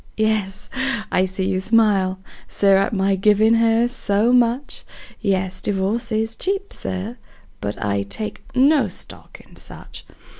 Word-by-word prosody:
Yes, 210 -2 -1 0.4
I 185 - +3
see 190 0 -3
you 190 -1 0
smile, 195 -3 +2 0.3
Sir, 195 -1 +3
at 195 - +1
my 195 -1 +1
givin' 210 +3 +4
her 230 +1 +3
so 225 -2 +1
much; 245 +3 +1 0.4
Yes, 190 -3 -1
divorce 210 +5 -1
is 220 +1 -1
cheap, 390 - -2
Sir, 195 +6 -5 0.4
but 100 0 -4
I 100 -1 0
take 210 - -6
no 280 +3 +4
stock - - -8
in - - -19
such! - - -7
210 Hz, 140 wpm, -21 LUFS, 190-230 Hz, 0.4 s, givin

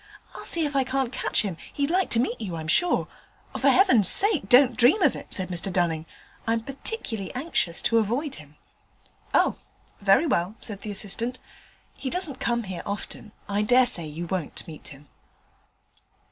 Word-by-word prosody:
I'll - - -9
see 330 -2 +1
if 290 -1 -3
I 270 - +4
can't 260 -1 -1
catch - - +2
him: 190 -6 -4
he'd 285 +2 -1
like 370 +1 +1
to 230 - +2
meet 240 -1 -1
you, 185 -6 -4
I'm 160 -1 -6
sure.' 350 - +2 0.5
'For - - +3
heaven's 250 - +5
sake 385 - +2
don't 250 -1 +6
dream 250 - +5
of - - +4
it!' - - -9
said 185 -1 -2
Mr 180 +2 -1
Dunning, 165 -3 0 0.4
'I'm 225 0 +1
particularly 255 - -4
anxious 255 - -1
to 230 - +3
avoid 245 +7 -1
him.' 150 0 -18 0.8
'Oh! - - +3 0.4
very 200 +10 +4
well,' 185 - 0
said 200 -2 -7
the 215 - -6
assistant, 225 +5 -2 0.5
'he 265 - -5
doesn't 325 -5 -2
come 235 0 0
here 185 -4 -5
often: 205 +1 -6 0.2
I 205 +1 0
dare 250 +4 +5
say 175 -10 0
you 160 +3 -6
won't 175 -3 -4
meet 155 -2 -9
him.' 145 +1 -13
225 Hz, 175 wpm, -25 LUFS, 185-270 Hz, 0.8 s, don't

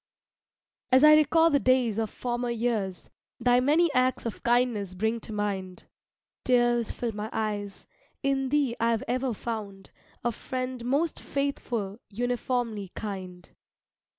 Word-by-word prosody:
As 260 +2 +6
I 305 0 +9
recall 320 +2 +5
the 285 - +4
days 250 -5 +2
of 220 -2 -1
former 240 +1 -3
years, 220 -6 -2 0.3
Thy 245 +1 +4
many 305 +5 +3
acts 255 -1 +1
of 230 - -4
kindness 235 -6 +1
bring 220 +4 0
to 220 - -9
mind, 195 -3 -3 0.6
Tears 240 -2 +2
fill 240 -2 -3
my 210 +1 -5
eyes, 205 -2 -3 0.4
in 270 -1 +1
thee 280 -4 +1
I've 230 -1 +1
ever 255 -1 -1
found 205 -4 -6 0.3
A 240 - +1
friend 255 +1 -5
most 290 +6 0
faithful, 240 -7 -3
uniformly 240 -2 -2
kind. 185 -4 -6
240 Hz, 130 wpm, -27 LUFS, 210-255 Hz, 0.6 s, I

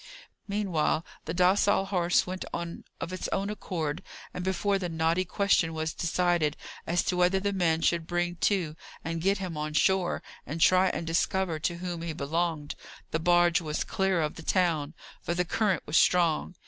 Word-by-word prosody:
Meanwhile 185 -6 0 0.2
the 165 - -3
docile 190 +2 +3
horse 180 -3 +2
went 185 0 -5
on 170 0 -6
of 185 - -5
its 185 - -3
own 200 +1 -1
accord, 165 -8 -3 0.3
and 180 - -4
before 195 +2 0
the 180 -2 -3
knotty 165 +3 +1
question 180 -4 +1
was 160 0 -2
decided 170 -3 +1 0.3
as 175 +1 +2
to 180 - -1
whether 180 +2 +3
the 200 +1 -1
man 165 -4 +1
should 170 -2 +1
bring 175 0 -1
to, 170 -5 0 0.3
and 165 0 -3
get 195 +3 +2
him 185 -4 -5
on 150 0 -3
shore, 190 +3 +2 0.2
and 155 +3 -5
try 185 +3 +5
and 170 - -3
discover 165 0 0
to 170 +2 -1
whom 175 -1 -4
he 165 -1 -3
belonged, 155 0 -2 0.4
the 160 - 0
barge 175 0 +4
was 155 -2 -2
clear 190 -3 0
of 150 - -3
the - - -7
town, 160 -4 +1 0.3
for 170 - -2
the 180 +1 +1
current 195 0 0
was 150 - +1
strong. 175 0 +3
175 Hz, 180 wpm, -28 LUFS, 160-185 Hz, 0.4 s, try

